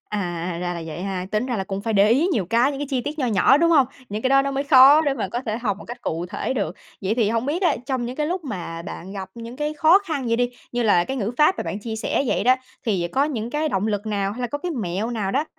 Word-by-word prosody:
À, 175 -4 -3
ra 175 -1 -3
vậy 165 +2 -6
ha. 190 -2 -3
Tính 215 +4 0
ra 245 -3 -2
là 190 - -2
cũng 195 0 -4
phải 225 0 -1
để 200 +1 +5
ý 275 +9 +4
nhiều 210 -7 +1
cái, 235 +8 +3
những 275 - -6
cái 290 - -2
chi 260 -2 0
tiết 290 +6 -5
nho 265 - +1
nhỏ, 225 +4 +4
đúng 335 +2 +3
hông? 280 -6 +5 0.2
Những 210 +2 -4
cái 260 - +2
đó 275 0 +5
nó 275 - -2
mới 275 +1 -2
khó 280 +1 +8
để 285 -3 +1
mà 190 - -3
có 235 +5 -3
thể 220 0 -1
học 210 -5 -1
một - - -11
cách 240 - -8
cụ 165 +2 -3
thể 205 +7 -3
được. 200 -8 -2 0.3
Vậy 195 +3 0
thì 225 -4 +2
hông 230 +2 -1
biết 320 +7 -1
á, 355 - +3
trong 260 -3 -1
những 250 - -6
cái 300 - 0
lúc 350 +1 -3
mà 175 - -5
bạn 180 +2 -8
gặp 190 -2 -6
những 235 +2 -8
cái 300 +1 -2
khó 315 +5 +6
khăn 315 -10 -4
vậy 230 0 +1
đi, 245 0 +1 0.2
như 240 0 0
là 200 -6 +4
cái 265 - -4
ngữ 220 -2 -2
pháp 305 +5 +5
mà - - -2
bạn 200 - -4
chia 220 +1 -5
sẻ 220 - 0
vậy - - 0
đó, 255 +1 +6 0.3
thì 185 -6 0
có 275 +2 +3
những 240 -6 -3
cái 305 +2 0
động 195 -4 0
lực 210 0 -2
nào 200 -2 -1
hay 245 - -8
là 245 - 0
có 290 +5 -4
cái 355 +4 -4
mẹo 215 - -2
nào 215 -5 -2
đó 280 +8 +1
235 Hz, 310 wpm, -23 LUFS, 200-275 Hz, 0.3 s, khó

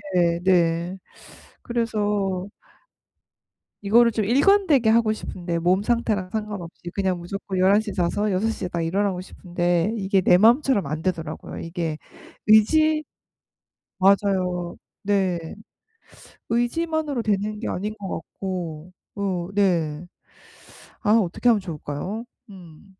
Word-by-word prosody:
네 170 -1 +3
네 175 0 +2 0.7
그래서 205 -5 -1 1.4
이거를 235 +3 +5
좀 215 -1 0
일관되게 285 - +4
하고 225 -1 +3
싶은데 175 -5 -4
몸 180 +4 +2
상태랑 215 -5 0
상관없이 205 -6 -6
그냥 190 -3 0
무조건 190 +2 -5
11 195 +3 +5
시에 215 -2 -5
자서 205 +3 0
6 195 +4 +1
시에 185 -5 -4
딱 170 -1 -3
일어나고 190 +2 0
싶은데 175 +1 -1
이게 195 -1 +1
내 180 0 +5
마음처럼 230 - +4
안 155 +3 -4
되더라고요. 160 -4 -4
이게 165 -2 -4 0.5
의지 305 +9 +5 1.0
맞아요. 185 -3 +2 0.3
네. 190 -5 0 0.9
의지만으로 290 +4 0
되는 210 0 -1
게 - - -3
아닌 210 +3 -3
것 195 -2 -6
같고. 175 -4 -6 0.3
으 185 -3 -2
네. 175 -5 +1 1.0
아 210 - +1
어떻게 225 +2 +1
하면 215 -4 +3
좋을까요? 180 +6 -5 0.2
음. 175 -2 -14
195 Hz, 240 characters per minute, -23 LUFS, 175-215 Hz, 1.4 s, 이거를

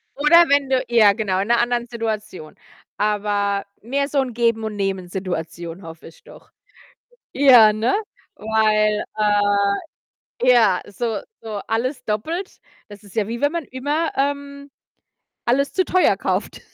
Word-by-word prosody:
Oder 335 +4 +6
wenn 280 -1 +2
du 260 -1 +1
ja 220 -4 +5
genau, 195 -4 -1
in 195 - -2
'ner 235 0 +3
anderen 240 0 0
Situation. 215 -8 -5 0.4
Aber 205 -1 -1 0.2
mehr 275 +5 -1
so 285 -1 0
'n 255 -2 -4
Geben-und-Nehmen-Situation, 190 -6 -3
hoffe 165 0 -11
ich 165 - -17
doch. - - -17 0.8
Ja, 245 -6 +7
ne? 220 +4 0 0.4
Weil, 215 -1 +1
äh 210 -1 +2 1.1
ja, 225 -7 +5
so 225 +1 -3 0.2
so 215 -2 -6
alles 250 +5 -2
doppelt, 320 - -4 0.3
das 205 -1 -13
ist 205 0 -16
ja 215 -2 +1
wie 235 +1 -5
wenn 290 - +2
man 340 -2 -3
immer, 290 +6 -2
ähm, 280 0 -3 0.7
alles 275 +4 +1
zu 375 - +1
teuer 370 +1 +2
kauft. - - -3
225 Hz, 135 wpm, -21 LUFS, 205-270 Hz, 1.1 s, Ja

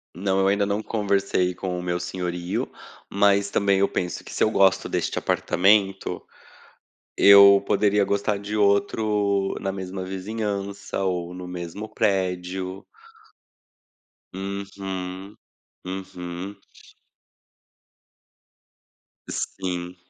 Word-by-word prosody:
Não, 95 +2 0
eu 95 - +3
ainda 100 +1 +2
não 100 +1 -1
conversei 100 -4 0
com 90 0 -4
o 90 - -5
meu 90 0 -1
senhorio, 90 -1 -3 0.4
mas 100 0 +3
também 100 -1 +2
eu 100 - +4
penso 90 -2 -3
que - - -10
se - - +1
eu - - +4
gosto 95 -2 +3
deste - - -1
apartamento, 95 +1 +2 1.0
eu 100 0 +8
poderia 105 -1 +2
gostar 100 +1 0
de 105 +1 -5
outro 100 -1 +1
na 95 - -2
mesma 95 -1 -5
vizinhança 100 0 -4
ou 90 -2 -2
no 90 0 -8
mesmo 90 +4 -6
prédio. 95 -1 -1 1.5
Uhum. 95 0 -6 0.5
Uhum. 95 0 -6 2.7
Sim. 90 -1 -4
95 Hz, 100 wpm, -24 LUFS, 90-100 Hz, 2.7 s, eu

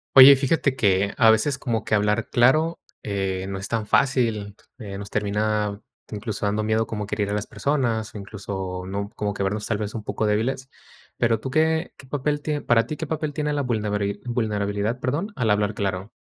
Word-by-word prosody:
Oye, 135 +1 +11
fíjate 135 0 +1
que 100 -3 +2
a 115 -2 +6
veces 130 +6 +3
como 115 -5 -2
que - - -2
hablar 105 0 +1
claro, 155 +8 +3 0.2
eh, 95 -2 -2
no 95 -1 -4
es 95 - -5
tan 115 -2 -1
fácil, 115 -5 +1 0.2
eh, 100 -4 -6
nos 100 0 -8
termina 105 0 0 0.3
incluso 105 0 -4
dando 105 +1 0
miedo 110 +1 +1
como 105 -2 -4
que 100 - -6
herir 105 -1 -1
a - - -1
las 105 0 -1
personas, 120 -7 -1
o - - -4
incluso, 95 -2 -5
¿no?, 100 +1 -3
como 105 -1 -2
que 100 - -2
vernos 105 +2 -2
tal 110 - 0
vez 105 0 -4
un 110 - -5
poco 110 - -2
débiles. 115 +5 0 0.5
Pero 115 -2 +2
tú, 130 +4 -5
¿qué 160 +3 +1
qué 135 - -14
papel 145 +2 -1
tie 150 0 -2
para 115 -1 +3
ti 155 - -4
qué - - -3
papel 155 -1 -2
tiene 150 -1 -1
la 145 - 0
vulnebari 105 -5 -1
vulnerabilidad, 105 -1 -1
perdón, 155 +12 -2
al 115 -6 +1
hablar 105 0 +1
claro? 95 0 -2
110 Hz, 205 wpm, -24 LUFS, 100-130 Hz, 0.5 s, Oye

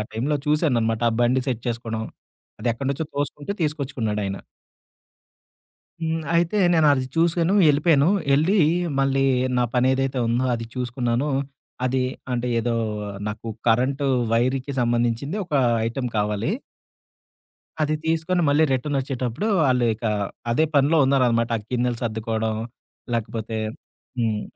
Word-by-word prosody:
టైమ్‌లో 135 +7 0
చూసాననమాట 120 -7 +1
ఆ - - -2
బండి 125 +2 +3
సెట్ 120 -3 -2
చేసుకోవడం. 115 -2 -3 0.6
అది 120 - -1
ఎక్కడి 130 +4 -4
నుంచో 145 +3 -2
తోసుకుంటూ 145 +4 -3
తీసుకొచ్చుకున్నాడు 135 -8 -2
ఆయన. 95 0 -3 1.6
హ్మ్. 160 0 -1
అయితే 170 +4 +2 0.2
నేను 160 -3 +4
అది 130 -1 -1
చూశాను 170 +2 +2 0.2
ఎళ్ళిపోయాను. 150 +1 +4 0.3
ఎళ్ళి 170 +9 +2 0.4
మళ్ళీ 135 0 +2 0.3
నా 125 - +3
పని 125 +1 +3
ఏదైతే 135 0 -1
ఉందో 120 +3 +1
అది 115 0 -5
చూసుకున్నాను. 125 +2 -1 0.6
అది 130 +1 +1 0.3
అంటే 125 0 -1
ఏదో 120 +1 -1 0.5
నాకు 105 +2 -6 0.2
కరెంటు 130 +5 +2 0.3
వైరుకి 130 +4 +1
సంబంధించింది 120 - 0
ఒక 170 - -9 0.3
ఐటెమ్ 125 +1 -3
కావాలి. 105 - 0 1.3
అది 155 0 +1
తీసుకొని 165 +3 +1
మళ్ళీ 145 +2 +4
రిటర్నొచ్చేటప్పుడు 130 - -2 0.2
వాళ్ళు 125 -3 +3
ఇక 115 +2 -7 0.5
అదే 135 +7 +3
పనిలో 145 +4 +4
ఉన్నారనమాట. 125 -4 +2
ఆ - - -7
గిన్నెలు 125 -1 0
సర్దుకోవడం 110 -1 -2 0.6
లేకపోతే 115 -1 -3 0.6
హ్మ్. 110 -3 0
130 Hz, 120 wpm, -23 LUFS, 115-145 Hz, 1.6 s, నేను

